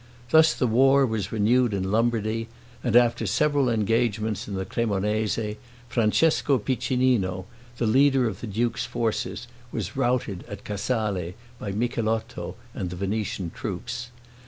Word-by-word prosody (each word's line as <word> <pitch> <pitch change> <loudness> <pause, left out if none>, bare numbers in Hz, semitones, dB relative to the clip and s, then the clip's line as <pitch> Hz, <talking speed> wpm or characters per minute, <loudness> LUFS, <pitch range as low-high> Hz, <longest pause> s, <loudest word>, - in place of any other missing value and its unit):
Thus 160 0 +6
the 130 - +1
war 135 +4 +5
was 110 -4 -2
renewed 115 +1 +2
in 95 0 -2
Lombardy, 115 0 0 0.4
and 120 -3 0
after 120 -2 +4
several 145 +4 +2
engagements 110 -1 0
in 100 - -4
the 95 0 -2
Cremonese, 105 0 -1 0.3
Francesco 135 +5 +3
Piccinino, 120 -5 0 0.3
the 120 - 0
leader 135 +2 +4
of 100 -5 -5
the 120 - -5
duke's 115 +4 -1
forces, 120 -1 -2 0.3
was 105 -6 -4
routed 120 -7 0
at 100 -3 -8
Casale, 100 -4 -2 0.2
by 100 - -4
Micheletto 115 +1 -2 0.2
and 95 -3 -3
the 90 - -6
Venetian 100 -2 -2
troops. 120 +8 -5
115 Hz, 135 wpm, -25 LUFS, 105-120 Hz, 0.4 s, Thus